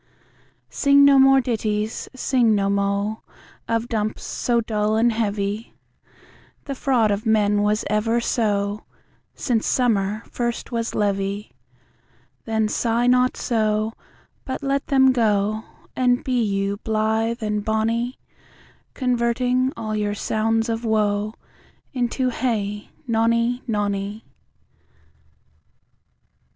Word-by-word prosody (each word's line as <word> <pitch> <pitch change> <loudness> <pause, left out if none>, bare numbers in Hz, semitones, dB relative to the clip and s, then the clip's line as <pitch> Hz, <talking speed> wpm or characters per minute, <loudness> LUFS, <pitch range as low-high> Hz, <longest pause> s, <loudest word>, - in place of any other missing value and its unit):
Sing 280 0 +5
no 280 -1 +6
more 270 0 +6
ditties, 215 -3 -2
sing 245 -4 +2
no 200 -1 +1
mo, 200 +2 -1 0.5
Or 230 - +3
dumps 220 -2 -3
so 240 -1 0
dull 215 -1 0
and 235 +2 +3
heavy; 210 0 -2 0.9
The 280 - -4
fraud 250 -5 +2
of 205 +2 -2
men 210 -1 +3
was 210 +1 +1
ever 215 +3 +1
so, 205 -3 -1 0.5
Since 230 -4 0
summer 215 -3 +1
first 240 +1 -3
was 230 -1 -2
leavy. 200 0 -1 0.9
Then 220 -1 0
sigh 230 +2 0
not 250 0 +3
so, 215 -2 0 0.5
But 260 +2 -5
let 275 0 -1
them 265 -1 +5
go, 215 -2 +1 0.3
And 250 -1 +2
be 250 -2 0
you 200 -1 -1
blithe 220 +1 -1
and 210 -1 -1
bonny, 225 +3 -1 0.8
Converting 250 +1 +1
all 215 -1 -3
your 205 -1 -1
sounds 225 +2 0
of 230 0 -2
woe 215 -1 0 0.6
Into. 250 0 0
Hey, 210 -4 -2 0.2
nonny, 230 +1 +1
nonny. 205 -1 -2
220 Hz, 110 wpm, -22 LUFS, 210-240 Hz, 0.9 s, no